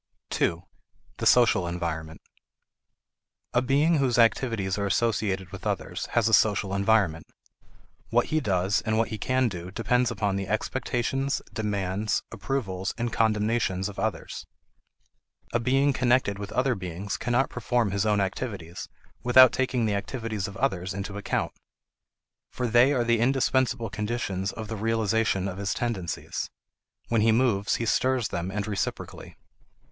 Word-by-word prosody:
2. 85 Hz, +1 st, 0 dB, 0.5 s
The -, -, 0 dB
Social 110 Hz, -7 st, +5 dB
Environment. 80 Hz, -2 st, -4 dB, 1.3 s
A 120 Hz, -, +3 dB
being 145 Hz, +6 st, +3 dB
whose 130 Hz, -3 st, +1 dB
activities 115 Hz, -5 st, +2 dB
are 100 Hz, -1 st, -1 dB
associated 100 Hz, -4 st, 0 dB
with -, -, -6 dB
others -, -, -3 dB
has 115 Hz, -2 st, +3 dB
a 110 Hz, -, 0 dB
social 100 Hz, -2 st, +3 dB
environment. 100 Hz, -5 st, +2 dB, 0.8 s
What -, -, +3 dB
he 155 Hz, -, +4 dB
does 95 Hz, -5 st, +1 dB
and 110 Hz, -1 st, -1 dB
what 115 Hz, -, +1 dB
he 110 Hz, -1 st, -5 dB
can 130 Hz, +3 st, +1 dB
do 90 Hz, -4 st, -6 dB
depend 120 Hz, +4 st, +1 dB
upon 105 Hz, -4 st, -1 dB
the 95 Hz, -1 st, -3 dB
expectations, 130 Hz, +5 st, -1 dB
demands, 105 Hz, -2 st, -1 dB
approvals, 95 Hz, -8 st, -3 dB
and 120 Hz, -1 st, -2 dB
condemnations 105 Hz, -3 st, +1 dB
of 100 Hz, -, -8 dB
others. -, -, -3 dB, 1.1 s
A 120 Hz, -, +2 dB
being 135 Hz, +4 st, +2 dB
connected 125 Hz, -6 st, +2 dB
with 100 Hz, -1 st, -6 dB
other 130 Hz, 0 st, +2 dB
beings 95 Hz, 0 st, -5 dB
cannot 120 Hz, +3 st, 0 dB
perform 120 Hz, -2 st, 0 dB
his 100 Hz, 0 st, 0 dB
own 105 Hz, -1 st, +2 dB
activities 95 Hz, -3 st, -4 dB, 0.3 s
without 125 Hz, +1 st, +7 dB
taking 130 Hz, -3 st, 0 dB
the 105 Hz, -, +1 dB
activities 110 Hz, -1 st, -3 dB
of 100 Hz, -1 st, -9 dB
others 95 Hz, -8 st, -1 dB
into 100 Hz, 0 st, -5 dB
account. 100 Hz, -, -2 dB, 1.0 s
For 125 Hz, -, -3 dB
they 120 Hz, +3 st, +5 dB
are 130 Hz, -4 st, +2 dB
the 115 Hz, -1 st, +2 dB
indispensable 130 Hz, -1 st, +1 dB
conditions 105 Hz, -3 st, -2 dB
of 110 Hz, -1 st, -7 dB
the 110 Hz, -, -4 dB
realization 110 Hz, -2 st, +1 dB
of 95 Hz, 0 st, -5 dB
his 100 Hz, -1 st, -1 dB
tendencies. 100 Hz, -9 st, -3 dB, 0.6 s
When 115 Hz, -2 st, +2 dB
he 110 Hz, +1 st, +4 dB
moves 110 Hz, -4 st, +2 dB
he 115 Hz, -, -2 dB
stirs 130 Hz, 0 st, +1 dB
them 85 Hz, +2 st, -3 dB
and 100 Hz, +1 st, -3 dB
reciprocally. 100 Hz, -3 st, -4 dB
110 Hz, 145 wpm, -26 LUFS, 95-120 Hz, 1.3 s, without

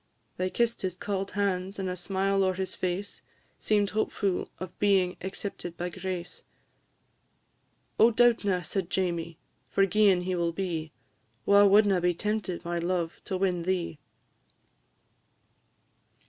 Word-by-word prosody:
They 185 Hz, +1 st, 0 dB
kiss'd 235 Hz, +3 st, 0 dB
his 185 Hz, -2 st, -3 dB
cauld 195 Hz, 0 st, -3 dB
hands, 195 Hz, -1 st, -1 dB
and 190 Hz, -1 st, -3 dB
a 180 Hz, -, -2 dB
smile 195 Hz, +2 st, 0 dB
o'er 185 Hz, -1 st, +1 dB
his 190 Hz, 0 st, -3 dB
face 185 Hz, +3 st, -3 dB, 0.4 s
Seem'd 205 Hz, -2 st, +1 dB
hopefu' 205 Hz, -3 st, -1 dB
of 185 Hz, -1 st, -8 dB
being 190 Hz, -3 st, +3 dB
accepted 190 Hz, -3 st, -5 dB
by 175 Hz, +1 st, -3 dB
grace; 185 Hz, -1 st, -5 dB, 1.6 s
"Oh, 225 Hz, -, +8 dB
doubtna," 220 Hz, -6 st, +3 dB
said 190 Hz, -3 st, -2 dB
Jamie, 170 Hz, -3 st, -1 dB, 0.3 s
"forgi'en 195 Hz, -1 st, +3 dB
he 185 Hz, +1 st, -2 dB
will 170 Hz, -1 st, 0 dB
be, 165 Hz, -4 st, -3 dB, 0.5 s
Wha 200 Hz, 0 st, +6 dB
wadna 200 Hz, -2 st, +5 dB
be 175 Hz, 0 st, +2 dB
tempted, 190 Hz, -3 st, -2 dB
my 170 Hz, 0 st, -1 dB
love, 170 Hz, -1 st, -2 dB
to 190 Hz, -, -2 dB
win 185 Hz, -2 st, 0 dB
thee?" 170 Hz, -3 st, -2 dB
185 Hz, 130 wpm, -28 LUFS, 175-200 Hz, 1.6 s, Oh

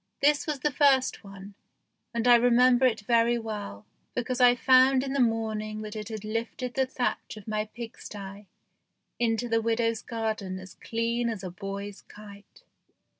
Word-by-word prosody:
This 290 Hz, +2 st, +3 dB
was 295 Hz, -3 st, -3 dB
the 300 Hz, -, +1 dB
first 270 Hz, -3 st, +3 dB
one, 195 Hz, 0 st, -11 dB, 0.6 s
and 235 Hz, 0 st, -1 dB
I 245 Hz, -, +8 dB
remember 245 Hz, +1 st, +5 dB
it 220 Hz, -4 st, -1 dB
very 235 Hz, +2 st, +3 dB
well, 205 Hz, -, -6 dB, 0.3 s
because 250 Hz, +1 st, -2 dB
I 245 Hz, 0 st, +7 dB
found 260 Hz, +1 st, +5 dB
in 270 Hz, -1 st, -3 dB
the 280 Hz, -, 0 dB
morning 215 Hz, -2 st, -1 dB
that 215 Hz, 0 st, -7 dB
it 215 Hz, 0 st, -6 dB
had 215 Hz, -2 st, -6 dB
lifted 230 Hz, +3 st, -4 dB
the 265 Hz, -1 st, +1 dB
thatch 250 Hz, -3 st, -3 dB
of 215 Hz, -, -12 dB
my 215 Hz, 0 st, -1 dB
pigsty 205 Hz, -3 st, -9 dB, 0.7 s
into 235 Hz, 0 st, 0 dB
the 230 Hz, -1 st, +1 dB
widow's 230 Hz, 0 st, 0 dB
garden 220 Hz, -5 st, -3 dB
as 185 Hz, 0 st, -11 dB
clean 235 Hz, +1 st, -2 dB
as 215 Hz, -4 st, -5 dB
a 185 Hz, -, -5 dB
boy's 195 Hz, +2 st, -7 dB
kite. 205 Hz, -1 st, -15 dB
225 Hz, 165 wpm, -27 LUFS, 210-245 Hz, 0.7 s, I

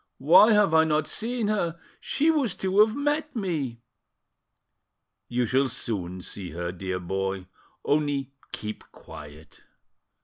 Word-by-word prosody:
"Why 180 Hz, -, +7 dB
have 210 Hz, -5 st, +4 dB
I 160 Hz, 0 st, +6 dB
not 155 Hz, -1 st, +1 dB
seen 230 Hz, +3 st, -2 dB
her? 170 Hz, -6 st, -1 dB, 0.2 s
She 310 Hz, +3 st, +2 dB
was 270 Hz, -, 0 dB
to 190 Hz, +1 st, 0 dB
have 215 Hz, +1 st, +5 dB
met 295 Hz, +1 st, -1 dB
me." 150 Hz, -, -3 dB, 1.5 s
You 125 Hz, 0 st, 0 dB
shall 130 Hz, +4 st, +1 dB
soon 95 Hz, -6 st, -4 dB
see 95 Hz, -3 st, -6 dB
her, 85 Hz, +2 st, -4 dB
dear 95 Hz, 0 st, -4 dB
boy; 95 Hz, +1 st, -3 dB, 0.4 s
only 145 Hz, -2 st, 0 dB, 0.2 s
keep 105 Hz, 0 st, -6 dB
quiet." 75 Hz, +1 st, -13 dB
145 Hz, 130 wpm, -26 LUFS, -, 1.5 s, Why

